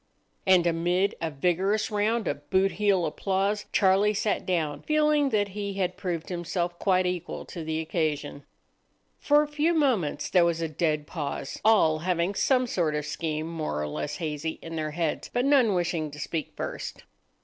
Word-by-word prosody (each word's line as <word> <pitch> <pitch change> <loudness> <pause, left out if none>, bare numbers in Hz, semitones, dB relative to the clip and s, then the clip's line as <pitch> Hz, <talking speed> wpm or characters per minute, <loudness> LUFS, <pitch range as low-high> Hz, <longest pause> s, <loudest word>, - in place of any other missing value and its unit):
And 185 -2 +5
amid 175 +3 +1
a 165 - -1
vigorous 185 +9 0
round 215 0 0
of 145 0 -4
boot 190 +1 +3
heel 200 -4 +2
applause 195 +6 -1
Charlie 200 +2 +3
sat 205 +1 -1
down, 155 -5 -1
feeling 300 -2 +2
that 205 -4 +1
he 200 0 -4
had 180 -2 -1
proved 175 -4 -4
himself 175 0 -3
quite 185 -2 +2
equal 180 -1 -3
to 170 - -7
the 160 0 -2
occasion. 155 -3 -2 0.8
For 295 +1 +4
a - - -4
few 300 +3 +1
moments 250 - +1
there 180 -2 +5
was 170 -1 +1
a 165 - -1
dead 155 -1 -1
pause, 145 -4 -5
all 195 -8 +4
having 175 +2 0
some 255 +4 +2
sort 170 -9 0
of 150 - 0
a - - -7
scheme, 155 -1 -3
more 155 - -3
or 75 - -2
less 75 0 -4
hazy, 160 0 -3
in 165 0 -6
their 155 -1 -2
heads, 160 0 -2
but 245 +1 0
none 260 -8 +4
wishing 170 -3 -1
to 150 +1 -11
speak 155 +1 -4
first. - - -5
175 Hz, 180 wpm, -27 LUFS, 160-205 Hz, 0.8 s, And